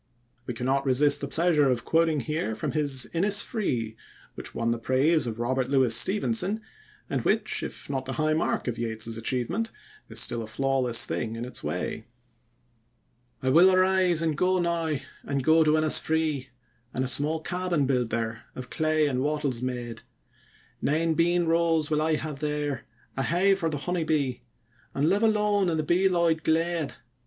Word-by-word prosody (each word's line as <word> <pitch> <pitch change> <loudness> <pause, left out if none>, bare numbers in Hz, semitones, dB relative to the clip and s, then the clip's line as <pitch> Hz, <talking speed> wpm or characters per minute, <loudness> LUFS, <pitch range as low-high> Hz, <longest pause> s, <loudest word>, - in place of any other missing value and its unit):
We 125 - -4
cannot 135 +3 0
resist 145 +2 +3
the 140 - -3
pleasure 155 -2 +2
of 125 -2 -1
quoting 160 -3 +2
here 150 -4 -3
from 110 - -3
his 140 -4 +1
"Innisfree", 180 - 0 0.4
which - - -8
won 115 0 0
the 115 - -2
praise 135 +4 +2
of 110 -1 -4
Robert 130 +2 -1
Louis 130 -4 +3
Stevenson, 205 - +2 0.5
and - - -2
which, - - 0
if - - -5
not 135 -2 -3
the 130 - -4
high 155 +1 +1
mark 155 - -1
of 120 -1 -3
Yeats's 115 -1 -3
achievement, 130 - -2 0.4
is - - -1
still 120 - 0
a 110 - -6
flawless 130 -1 +2
thing 115 0 -3
in 115 +1 -5
its 125 - -7
way: 110 - -4 1.4
I 130 - +1
will 175 +6 +7
arise 185 -2 +3
and 160 -2 0
go 185 +4 +2
now, 170 -3 0 0.2
and 140 -2 -3
go 160 +2 +5
to 155 0 +3
Innisfree, 155 -2 +1 0.5
And 130 - 0
a - - -3
small 150 +5 -1
cabin 175 -2 -1
build 125 -3 0
there, 115 -1 -3
of 125 0 -8
clay 155 -1 +1
and 130 -3 -1
wattles 145 -4 -1
made; 120 -2 -4 0.8
Nine 160 +3 +1
bean 175 +2 +2
rows 165 -2 +1
will 155 0 +2
I 155 0 +2
have 150 -2 -5
there, 150 -3 -3 0.3
a 135 - -1
hive 190 +7 +2
for 165 -3 0
the 150 - -3
honey 175 +4 -2
bee, 140 -6 -1 0.5
And 145 +3 +2
live 200 - +2
alone 210 -3 +2
in 160 - 0
the 155 - 0
bee 175 +5 +2
loud 170 -3 +1
glade. 165 -2 0
150 Hz, 175 wpm, -26 LUFS, 130-170 Hz, 1.4 s, will